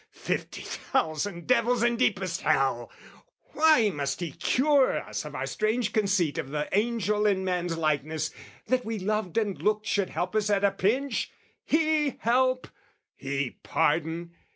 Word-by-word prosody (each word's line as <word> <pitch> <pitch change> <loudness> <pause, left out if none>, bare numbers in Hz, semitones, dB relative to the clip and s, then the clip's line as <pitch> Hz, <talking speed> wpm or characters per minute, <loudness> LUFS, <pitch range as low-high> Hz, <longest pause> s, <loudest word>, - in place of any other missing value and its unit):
fifty - - -4
thousand 170 +3 -2
devils 245 -1 +2
in 240 0 +3
deepest 190 -6 0
hell! 135 -3 +1 0.6
Why 305 -9 +5
must 140 -2 -3
he 170 -3 -4
cure 275 - +2
us - - -5
of - - -8
our - - -2
strange 220 +1 -1
conceit 195 -7 +1
Of 145 -5 -4
the 150 +1 -2
angel 210 -1 +1
in 190 -2 +1
man's 175 -2 -1
likeness, 155 0 -1 0.3
that 255 +2 +1
we 225 0 -3
loved 210 -2 -2
And 205 -4 0
looked 210 0 +1
should 200 -3 0
help 180 +2 -3
us 215 -1 +1
at 200 -1 +2
a 200 - +4
pinch? 230 +7 0 0.3
He 310 -3 +1
help? 255 +2 +1 0.5
He 140 -1 -3
pardon? 165 +2 0
205 Hz, 150 wpm, -27 LUFS, 165-235 Hz, 0.6 s, Why